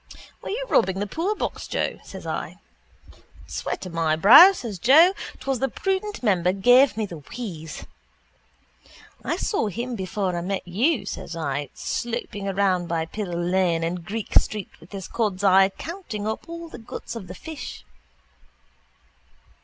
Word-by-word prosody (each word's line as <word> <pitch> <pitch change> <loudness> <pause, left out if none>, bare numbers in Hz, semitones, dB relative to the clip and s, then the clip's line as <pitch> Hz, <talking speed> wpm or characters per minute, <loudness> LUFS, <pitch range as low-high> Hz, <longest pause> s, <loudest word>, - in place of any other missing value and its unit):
—Were - - -7
you - - -2
robbing 190 - +2
the 205 - -1
poorbox, 345 - -3
Joe? - - -2
says - - -10
I. - - -4 0.9
—Sweat - - -4
of 180 - -8
my 165 -2 +1
brow, 255 - +10
says 230 - -6
Joe. 315 - +7 0.3
'Twas 270 -3 -2
the 270 - 0
prudent 390 - -2
member 180 -5 +3
gave 245 +5 +5
me 220 - 0
the 170 -5 -8
wheeze. 165 - -7 1.4
—I - - -1
saw 400 - 0
him 240 +5 -4
before 190 -1 -2
I 170 - -2
met 190 +1 -3
you, 225 - +1
says 175 - -6
I, 145 -3 -3
sloping 230 -4 -4
around 190 -2 +1
by 165 -1 -1
Pill 205 +5 -5
lane 175 -1 +1
and 170 +1 -2
Greek 210 +5 -5
street 210 -3 -6
with 165 - -17
his 195 -2 -6
cod's 205 -4 -1
eye 190 0 +6
counting 265 - -6
up 220 +8 -4
all 335 0 -7
the 315 - -10
guts 225 - -8
of 195 -5 -7
the 180 - -8
fish. 315 - -8
200 Hz, 155 wpm, -24 LUFS, 180-250 Hz, 1.4 s, brow